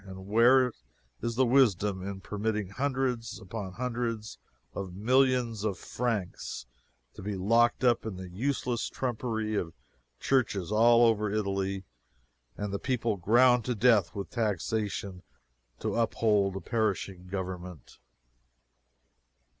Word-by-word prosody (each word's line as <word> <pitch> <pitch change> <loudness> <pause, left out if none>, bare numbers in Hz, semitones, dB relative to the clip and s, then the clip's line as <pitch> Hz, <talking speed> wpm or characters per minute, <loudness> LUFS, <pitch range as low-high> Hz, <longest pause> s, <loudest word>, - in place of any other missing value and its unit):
And, 95 -1 -10
where 120 +3 +5 0.5
is 115 0 -2
the 130 +2 +4
wisdom 105 -7 +3
in 95 0 -6
permitting 105 -1 -2
hundreds 125 -1 -2
upon 95 -1 -6
hundreds 120 -2 -3 0.3
of 95 -2 -6
millions 125 0 +2
of 100 -4 -1
francs 100 - -3 0.5
to - - -10
be 100 +1 -3
locked 115 +7 +3
up 120 -2 +3
in 110 -4 -5
the 95 0 -7
useless 120 +4 -2
trumpery 110 -3 -2
of 85 -6 -2 0.4
churches 105 -9 0
all 115 +2 +6
over 105 -2 +2
Italy, 100 -2 -1 0.7
and 105 -1 -4
the 100 - -2
people 120 -4 0
ground 120 +6 +4
to 125 - -1
death 110 -2 +3
with 100 -1 -5
taxation 100 -3 -2 0.6
to - - -1
uphold 105 -4 +2
a 95 - -4
perishing 100 -5 -2
Government? 90 -4 -6
110 Hz, 120 wpm, -29 LUFS, 95-120 Hz, 0.7 s, all